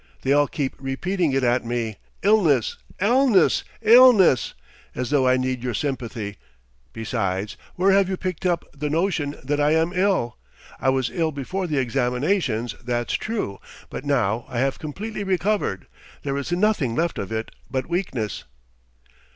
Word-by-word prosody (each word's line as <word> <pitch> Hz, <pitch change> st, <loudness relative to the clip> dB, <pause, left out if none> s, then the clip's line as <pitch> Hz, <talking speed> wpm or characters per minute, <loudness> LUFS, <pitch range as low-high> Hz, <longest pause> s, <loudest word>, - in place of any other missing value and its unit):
They 135 Hz, -, +3 dB
all 145 Hz, 0 st, +4 dB
keep 135 Hz, -2 st, -2 dB
repeating 160 Hz, +5 st, -1 dB
it 135 Hz, 0 st, +1 dB
at 120 Hz, +1 st, +2 dB
me: 115 Hz, -3 st, -3 dB, 0.3 s
illness! 170 Hz, -, +3 dB, 0.2 s
illness! 240 Hz, +2 st, +4 dB, 0.2 s
illness!... 225 Hz, -, +6 dB, 0.4 s
As 125 Hz, +2 st, -3 dB
though 135 Hz, -3 st, +3 dB
I 130 Hz, 0 st, +4 dB
need 130 Hz, -1 st, -1 dB
your 125 Hz, -3 st, -2 dB
sympathy! 120 Hz, -6 st, -3 dB, 0.5 s
Besides, 100 Hz, -3 st, -2 dB, 0.2 s
where 190 Hz, +2 st, +3 dB
have 195 Hz, -1 st, +4 dB
you 190 Hz, -, -2 dB
picked 185 Hz, -2 st, -4 dB
up 175 Hz, -2 st, 0 dB
the 150 Hz, +1 st, -3 dB
notion 160 Hz, -3 st, 0 dB
that 145 Hz, +2 st, -1 dB
I 150 Hz, +2 st, +3 dB
am 165 Hz, +2 st, +1 dB
ill? 185 Hz, -, +1 dB, 0.4 s
I 130 Hz, -, +2 dB
was 130 Hz, -2 st, 0 dB
ill 165 Hz, -3 st, 0 dB
before 180 Hz, +7 st, -3 dB
the 150 Hz, -3 st, -1 dB
examinations, 125 Hz, -, 0 dB
that's 120 Hz, 0 st, -2 dB
true, 210 Hz, -, -3 dB, 0.3 s
but -, -, -5 dB
now 120 Hz, -6 st, 0 dB
I 120 Hz, -, -5 dB
have 135 Hz, +2 st, 0 dB
completely 205 Hz, +8 st, -5 dB
recovered, 190 Hz, -, 0 dB, 0.4 s
there 140 Hz, -1 st, -2 dB
is 140 Hz, +4 st, -3 dB
nothing 175 Hz, -, +1 dB
left 170 Hz, +3 st, 0 dB
of 100 Hz, -, -5 dB
it 110 Hz, 0 st, -3 dB, 0.2 s
but 130 Hz, -1 st, -2 dB
weakness." 135 Hz, -, -3 dB
140 Hz, 155 wpm, -23 LUFS, 120-185 Hz, 0.5 s, illness